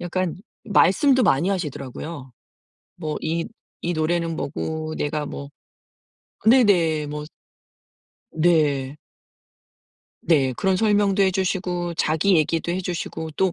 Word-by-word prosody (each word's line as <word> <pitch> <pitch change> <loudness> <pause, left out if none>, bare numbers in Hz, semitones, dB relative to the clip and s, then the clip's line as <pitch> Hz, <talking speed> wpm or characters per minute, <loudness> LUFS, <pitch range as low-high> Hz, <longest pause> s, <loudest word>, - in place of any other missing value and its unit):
약간 175 -1 -2 0.3
말씀도 250 - +4
많이 170 +2 +3
하시더라고요. 150 -5 -5 0.7
뭐 155 -3 -4
"이 165 +1 -2 0.4
이 175 - -1
노래는 165 +1 -1
뭐고 155 +2 -4
내가 150 0 -2
뭐." 140 0 -7 1.0
네네 175 - +4
뭐 150 0 -6 1.1
네. 150 -5 +2 1.3
네. 135 -6 +2
그런 190 -1 +1
설명도 205 -1 +3
해주시고 185 -2 -1
자기 160 +4 +2
얘기도 165 +2 0
해주시고 175 -3 -4
또 185 +3 +1
170 Hz, 215 characters per minute, -23 LUFS, 155-185 Hz, 1.3 s, 말씀도